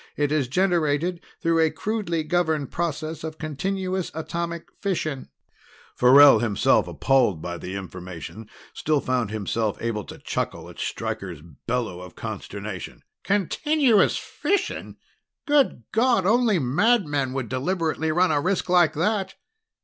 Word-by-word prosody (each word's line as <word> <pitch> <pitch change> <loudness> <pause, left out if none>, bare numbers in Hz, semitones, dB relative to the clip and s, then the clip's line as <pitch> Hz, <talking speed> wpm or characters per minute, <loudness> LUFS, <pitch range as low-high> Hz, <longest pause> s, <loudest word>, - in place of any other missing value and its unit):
It 145 -1 +1
is 150 -4 +1
generated 170 +1 +1 0.2
through 165 0 +3
a 160 -1 +4
crudely 195 -5 -2
governed 160 -4 0
process 160 -1 -3
of 160 0 -5
continuous 185 +4 -2
atomic 170 +1 -4
fission." 155 -8 -2 0.7
Farrell, 140 +3 +8
himself 110 -4 +2
appalled 125 -11 +2
by 85 +2 -5
the 95 +2 -6
information, 95 +2 -8 0.2
still 155 -1 +1
found 125 -5 -1
himself 110 0 -2
able 115 -3 -2
to - - -10
chuckle - - -4
at - - -13
Stryker's 85 -6 -4 0.2
bellow 115 -7 -2
of 90 -2 -11
consternation. 100 -3 -7 0.2
"Continuous 230 - +2
fission? 405 - -2 0.5
Good 290 - +2
God, 230 -4 +3
only 225 0 +3
madmen 145 - +2
would 130 -3 -3
deliberately 160 - -1
run 180 +2 +3
a 145 -1 +2
risk 185 +2 -1
like 175 -2 +4
that!" 190 +4 0
155 Hz, 125 wpm, -24 LUFS, 125-185 Hz, 0.7 s, Farrell